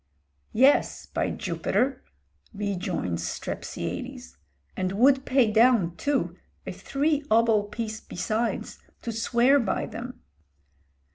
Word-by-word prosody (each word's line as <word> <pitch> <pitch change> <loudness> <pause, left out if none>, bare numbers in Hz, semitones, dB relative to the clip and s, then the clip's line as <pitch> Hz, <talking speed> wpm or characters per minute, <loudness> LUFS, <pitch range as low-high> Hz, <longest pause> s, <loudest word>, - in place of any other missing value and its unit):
"Yes, 265 +5 +4
by - - -2
Jupiter!" 265 +1 -1 0.5
rejoins 185 - -2
Strepsiades, 65 -6 -5 0.4
"and 185 0 -1
would 265 +5 +4
pay 255 -5 +3
down, 220 -6 +4
too, 285 +6 -1 0.3
a - - -4
three 290 +1 0
obol 220 -2 +4
piece 220 -1 -4
besides 220 +5 -3 0.2
to 235 - -3
swear 235 +5 +3
by 220 -7 -1
them." 245 +3 -8
230 Hz, 100 wpm, -26 LUFS, 205-260 Hz, 0.5 s, Yes